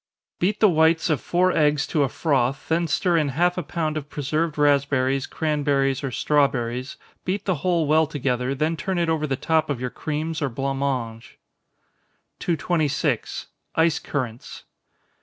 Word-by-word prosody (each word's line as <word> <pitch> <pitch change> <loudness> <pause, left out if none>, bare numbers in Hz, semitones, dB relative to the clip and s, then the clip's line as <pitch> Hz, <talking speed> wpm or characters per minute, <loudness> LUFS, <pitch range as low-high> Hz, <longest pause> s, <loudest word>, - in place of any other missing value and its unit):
_ - - -55
Beat 195 +4 +1
the 215 - +6
whites 160 -1 +3
of 150 - 0
four 180 +1 +2
eggs 150 -1 +2
to 150 - 0
a 140 - +2
froth, 135 -4 0
then 165 +1 +1
stir 170 +3 +1
in 150 -3 +1
half 175 +1 +3
a 180 - -2
pound 155 -3 -2
of 150 -1 -6
preserved 150 +2 -2
raspberries, 140 -2 +2
cranberries, 140 -3 0
or 135 - -1
strawberries 130 -2 0 0.3
beat 190 +3 -2
the 185 -5 0
whole 175 -3 +1
well 155 +1 +3
together, 135 -3 -1
then 155 +4 0
turn 185 +5 -3
it 170 -1 +1
over 155 -1 0
the 135 - 0
top 160 +2 +1
of 140 -4 -1
your 125 -1 -3
creams 155 +1 -3
or 145 - 0
blanc 135 +2 -3
mange. 120 -5 -3 1.0
226. 155 -6 -1 0.3
_Ice 160 -1 +3
Currants. 125 -5 -5
150 Hz, 165 wpm, -23 LUFS, 135-165 Hz, 1.0 s, the